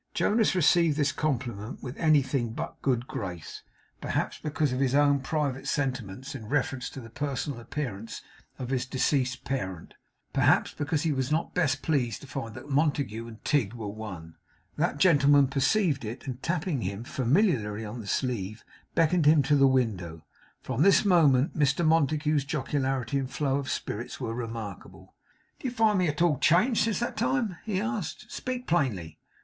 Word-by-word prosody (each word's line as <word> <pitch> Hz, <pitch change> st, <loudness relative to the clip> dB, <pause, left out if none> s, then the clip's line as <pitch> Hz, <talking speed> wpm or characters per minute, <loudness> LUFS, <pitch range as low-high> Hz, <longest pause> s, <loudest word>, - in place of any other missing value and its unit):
Jonas 220 Hz, -2 st, +2 dB
received 170 Hz, -3 st, +4 dB
this 145 Hz, -2 st, +2 dB
compliment 120 Hz, -6 st, -3 dB
with 125 Hz, +1 st, -6 dB
anything 135 Hz, -6 st, +2 dB
but -, -, -4 dB
a -, -, -29 dB
good 125 Hz, -3 st, +1 dB
grace, 90 Hz, -, -6 dB, 0.4 s
perhaps -, -, -2 dB
because 150 Hz, -3 st, -1 dB
of 130 Hz, -, -2 dB
his 135 Hz, -1 st, +2 dB
own 145 Hz, -1 st, +4 dB
private 135 Hz, -1 st, -2 dB
sentiments 130 Hz, -3 st, -2 dB
in 110 Hz, -, -8 dB
reference 135 Hz, -2 st, -1 dB
to -, -, -9 dB
the 115 Hz, -3 st, -11 dB
personal 145 Hz, -1 st, -3 dB
appearance 115 Hz, -4 st, -5 dB, 0.3 s
of 125 Hz, 0 st, -5 dB
his 130 Hz, -1 st, -1 dB
deceased 130 Hz, 0 st, 0 dB
parent; 95 Hz, -11 st, -4 dB, 0.4 s
perhaps -, -, +3 dB
because 145 Hz, 0 st, -1 dB
he 165 Hz, -, +1 dB
was 130 Hz, 0 st, -1 dB
not 160 Hz, +2 st, 0 dB
best 145 Hz, -6 st, +1 dB
pleased 130 Hz, -7 st, 0 dB
to -, -, -10 dB
find 130 Hz, -5 st, -6 dB
that -, -, -9 dB
Montague 140 Hz, -6 st, 0 dB
and 110 Hz, -1 st, -12 dB
Tigg 135 Hz, -9 st, +1 dB
were 110 Hz, -3 st, -5 dB
one. 95 Hz, -6 st, -8 dB, 0.4 s
That -, -, 0 dB
gentleman 145 Hz, -4 st, +5 dB
perceived 140 Hz, -, +1 dB
it, 115 Hz, +4 st, -6 dB
and 130 Hz, -1 st, -6 dB
tapping 170 Hz, -5 st, -1 dB
him 100 Hz, +4 st, -4 dB
familiarly 120 Hz, -, +1 dB
on 110 Hz, +3 st, -6 dB
the 105 Hz, -, -10 dB
sleeve, 110 Hz, -3 st, -2 dB, 0.3 s
beckoned 165 Hz, -1 st, +3 dB
him 150 Hz, -1 st, +6 dB
to 145 Hz, +2 st, +3 dB
the 135 Hz, -1 st, +6 dB
window. 95 Hz, -11 st, -1 dB, 0.4 s
From 130 Hz, -, -2 dB
this 195 Hz, +4 st, +5 dB
moment, 150 Hz, -8 st, +4 dB
Mr 145 Hz, +2 st, +2 dB
Montague's 155 Hz, -1 st, +2 dB
jocularity 135 Hz, -2 st, -1 dB
and 130 Hz, -2 st, -3 dB
flow 135 Hz, -1 st, 0 dB
of 140 Hz, -2 st, -4 dB
spirits 120 Hz, +4 st, -4 dB
were 115 Hz, -4 st, -3 dB
remarkable. 105 Hz, -5 st, -7 dB, 0.5 s
'Do -, -, -3 dB
you -, -, -2 dB
find 220 Hz, -4 st, +3 dB
me 180 Hz, -, +2 dB
at 150 Hz, +2 st, 0 dB
all 155 Hz, -6 st, +2 dB
changed 205 Hz, -, +4 dB
since 225 Hz, -2 st, 0 dB
that 240 Hz, -, -2 dB
time?' 230 Hz, -9 st, 0 dB
he 205 Hz, -4 st, -1 dB
asked. 205 Hz, -8 st, -4 dB
'Speak 250 Hz, -1 st, -4 dB
plainly. 120 Hz, -, -1 dB
135 Hz, 170 wpm, -28 LUFS, 120-155 Hz, 0.5 s, him